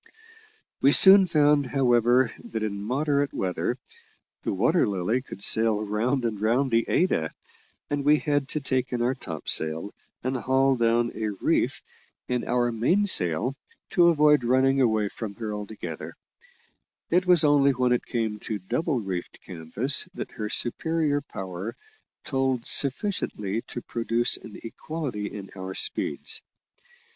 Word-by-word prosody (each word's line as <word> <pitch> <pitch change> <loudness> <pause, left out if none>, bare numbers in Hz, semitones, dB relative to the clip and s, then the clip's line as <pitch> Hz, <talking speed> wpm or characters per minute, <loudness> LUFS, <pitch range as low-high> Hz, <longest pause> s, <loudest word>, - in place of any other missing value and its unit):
We 140 +2 +5
soon 195 0 +8
found, 150 -4 +3
however, 125 -2 +2
that 110 -1 -4
in 100 -2 -3
moderate 140 +5 -1
weather 90 -1 -2 0.6
the - - -2
Water 120 - +2
Lily 100 +6 -1
could 100 -6 -9
sail 110 -1 +4
round 120 +5 -1
and 105 -3 -3
round 120 +5 +1
the 115 0 +2
Ada, 80 - +1 0.6
and 145 -1 -2
we 150 +2 +5
had 145 -2 -1
to 150 - -2
take 130 -2 -2
in 120 -1 -1
our 125 +2 +1
topsail 80 -4 -1 0.3
and 130 +1 -2
haul 130 +2 +2
down 120 0 +1
a 110 - -3
reef - - 0 0.4
in 125 -1 -1
our 120 -1 +1
mainsail 120 - +3 0.4
to 175 -1 +5
avoid 150 -4 +4
running 135 +2 +2
away 110 -4 +2
from 100 0 -7
her 110 -2 -5
altogether; 105 -6 -7 1.0
it 180 +2 +2
was 180 -3 +5
only 145 -2 +4
when 125 -2 +1
it 125 - +1
came 110 -3 -2
to 105 0 -4
double 135 - -2
reefed 95 -3 -5
canvas 95 - 0
that - - -6
her 105 -1 -5
superior 145 +5 -1
power 95 -3 -7 0.5
told 130 -3 -1
sufficiently 130 - 0
to 120 - -6
produce 115 +1 0
an 105 - -11
equality 125 -3 -5
in 100 -2 -9
our 95 0 -6
speeds. - - -1
120 Hz, 140 wpm, -25 LUFS, 105-140 Hz, 1.0 s, soon